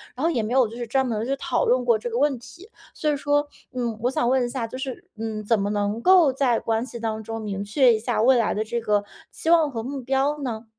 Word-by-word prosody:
然 260 - -5
后 330 - +3
也 245 - 0
没 215 +3 -3
有 260 -3 +4
就 225 - -10
是 240 - -4
专 265 +3 +1
门 220 -2 -2
去 270 +2 0
讨 - - 0
论 250 0 +2
过 235 -2 +4
这 240 - -4
个 235 - -3
问 280 0 +2
题。 340 - -14 0.2
所 305 - -1
以 - - 0
说， 290 +1 +1 0.3
嗯， 240 -3 -2
我 245 - +1
想 240 - 0
问 260 -1 +2
一 240 - -4
下， 240 -3 -3
就 240 - -8
是， 260 -1 -6
嗯， 220 -1 -4
怎 225 0 +2
么 200 +1 -1
能 205 +2 -1
够 360 -2 +6
在 255 -3 +2
关 225 +2 -1
系 235 -2 -8
当 220 -1 -3
中 225 +1 -5
明 200 -2 -4
确 245 +4 +4
一 220 - 0
下 215 - -1
未 255 +3 +5
来 230 - +1
的 215 - -1
这 235 +2 -3
个 210 -2 +1 0.3
期 325 - -4
望 330 -3 +5
和 225 -3 -4
目 270 +2 -5
标 270 +3 0
呢？ 235 -4 -4
240 Hz, 295 characters per minute, -24 LUFS, 220-270 Hz, 0.3 s, 够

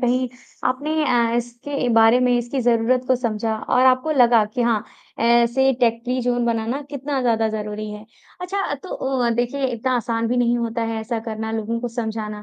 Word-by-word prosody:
कहीं 250 0 +1 0.4
आपने 280 +4 -2
अ, 235 -4 +2
इसके 240 +3 -3
बारे 225 +2 +6
में 250 -1 +3
इसकी 240 +3 -2
ज़रूरत 240 +1 +2
को 260 - +4
समझा 225 -2 -2
और 250 +3 +1
आपको 255 +4 +3
लगा 240 -5 +5
कि 245 - 0
हाँ, 230 -3 +1 0.3
ऐसे 235 +3 +3
टेक 230 -1 +2
फ्री 250 +1 -1
ज़ोन 245 -1 0
बनाना 230 +4 -1
कितना 280 -1 -3
ज़्यादा 225 -2 +2
ज़रूरी 210 0 -4
है। 210 0 -9 0.4
अच्छा 375 -3 -2
तो 285 +6 -11 0.4
अ, 235 - +2
देखिए 245 +4 -1
इतना 255 +1 -2
आसान 230 -1 -1
भी 250 - 0
नहीं 240 0 +2
होता 230 0 -2
है 225 -1 -2
ऐसा 230 +1 -3
करना, 220 0 -5
लोगों 225 +1 -2
को 245 - -3
समझाना, 220 -3 -4
235 Hz, 190 wpm, -21 LUFS, 225-255 Hz, 0.4 s, बारे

